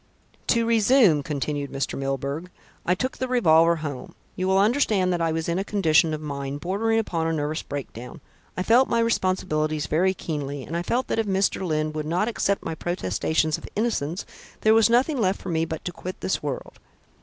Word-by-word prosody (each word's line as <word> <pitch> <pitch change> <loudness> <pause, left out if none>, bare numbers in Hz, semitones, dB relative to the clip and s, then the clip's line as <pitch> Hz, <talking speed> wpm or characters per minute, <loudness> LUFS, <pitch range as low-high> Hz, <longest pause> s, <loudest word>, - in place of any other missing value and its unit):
"To 230 -1 +3
resume," 225 - +4
continued 145 0 -3
Mr. 135 -1 -2
Milburgh, 140 +5 -3 0.4
"I 180 - +3
took 255 +7 -3
the 260 - -1
revolver 170 -9 +4
home. 140 -4 -6 0.2
You 185 0 -2
will 190 0 +3
understand 205 -4 +2
that 175 - -1
I 165 -1 +1
was 160 0 -2
in 170 +2 0
a - - 0
condition 165 -6 +3
of 155 -1 -3
mind 140 -1 -4
bordering 210 +7 0
upon 170 -7 -1
a - - 0
nervous 155 +1 -2
breakdown. 135 0 -7 0.4
I 185 - 0
felt 240 +6 +4
my 235 - +1
responsibilities 185 -9 0
very 185 +4 +1
keenly, 145 -5 -4
and 165 - -6
I 170 - 0
felt 240 +8 0
that - - 0
if 225 - 0
Mr. 195 0 +1
Lyne 155 -3 -1
would 155 0 -4
not 180 +6 +1
accept 200 -4 -1
my 165 - -2
protestations 160 - -1
of - - -10
innocence, 195 -7 -1 0.4
there 215 - +5
was 225 0 +5
nothing 255 +3 +2
left 190 -1 +1
for 190 - -7
me 165 -1 +1
but 160 -1 -6
to 180 - -2
quit 185 +1 -7
this 190 - -1
world." 145 -3 -5
170 Hz, 200 wpm, -24 LUFS, 155-205 Hz, 0.4 s, there